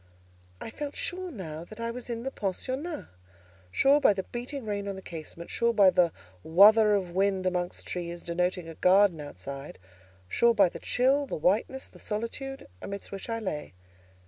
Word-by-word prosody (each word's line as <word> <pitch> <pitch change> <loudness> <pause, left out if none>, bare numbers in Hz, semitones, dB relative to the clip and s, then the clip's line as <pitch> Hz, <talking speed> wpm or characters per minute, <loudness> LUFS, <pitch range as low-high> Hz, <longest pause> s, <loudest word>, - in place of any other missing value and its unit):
I - - -7
felt 290 +3 -5
sure 370 0 -2
now 165 - -7
that 215 +6 -12
I 230 0 -2
was 245 +1 -8
in 230 -1 -3
the 270 - -3
pensionnat—sure 185 - -2
by 240 - +6
the 190 -1 -3
beating 245 +4 -5
rain 200 -1 -3
on 200 - -3
the 190 - -8
casement; 165 +1 -8
sure 235 0 +1
by 195 -3 +7
the 175 -2 +3 0.3
"wuther" 210 +5 +7
of 185 -3 -4
wind 190 0 +1
amongst 180 -1 -2
trees, 175 -1 -5
denoting 180 0 -1
a 165 - -7
garden 185 -1 +4
outside; 140 -1 -8 0.5
sure 235 - +3
by 195 -4 +5
the - - -9
chill, 270 +3 +2
the - - -3
whiteness, 210 +11 +1
the - - -17
solitude, 230 +5 -5
amidst 200 0 -6
which 195 +3 -7
I 230 - -1
lay. 185 - -4
200 Hz, 170 wpm, -28 LUFS, 175-235 Hz, 0.5 s, by